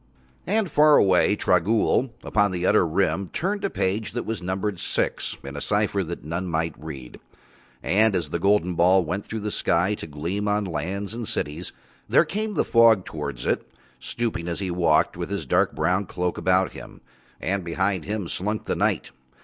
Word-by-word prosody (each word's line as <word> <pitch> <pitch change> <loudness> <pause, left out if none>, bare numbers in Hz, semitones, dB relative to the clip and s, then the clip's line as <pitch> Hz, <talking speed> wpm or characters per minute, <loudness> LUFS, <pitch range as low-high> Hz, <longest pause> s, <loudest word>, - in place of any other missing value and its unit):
And 210 +2 +1
far 150 -2 +5
away 95 +1 +4
Trogool 105 +8 +2
upon 105 0 +2
the 90 -1 -2
utter 90 - +4
Rim 95 +2 0
turned 200 +3 -2
a 200 - +1
page 105 - -2
that 120 - -3
was 110 -2 -3
numbered 95 +1 -2
six - - -1
in 70 +1 -7
a 70 - -5
cipher 105 -1 0
that 85 0 -6
none 85 +5 -3
might 80 -1 -1
read. 70 -5 -9 0.6
And 110 +1 +3
as 90 - -2
the 85 - -1
golden 100 -1 +2
ball 90 +2 +4
went 95 +6 -4
through 110 -1 -4
the 105 0 -3
sky 90 +2 +1
to 100 - -6
gleam 85 +8 -3
on 105 0 +1
lands 95 +5 -3
and 115 -1 -5
cities, 75 +5 -3 0.4
there - - +5
came 215 0 -3
the - - +1
Fog 115 -5 +5
towards - - -5
it, - - -1 0.3
stooping 115 -8 -3
as 85 - -3
he 95 -2 -2
walked 85 -3 +2
with - - -4
his - - -3
dark - - +2
brown 90 +6 +1
cloak 90 0 -2
about 95 0 +2
him, - - -11 0.4
and 95 0 -1
behind 95 +1 -1
him 105 -3 -3
slunk 105 +5 -3
the - - -1
Night. - - 0
95 Hz, 185 wpm, -24 LUFS, 85-105 Hz, 0.6 s, far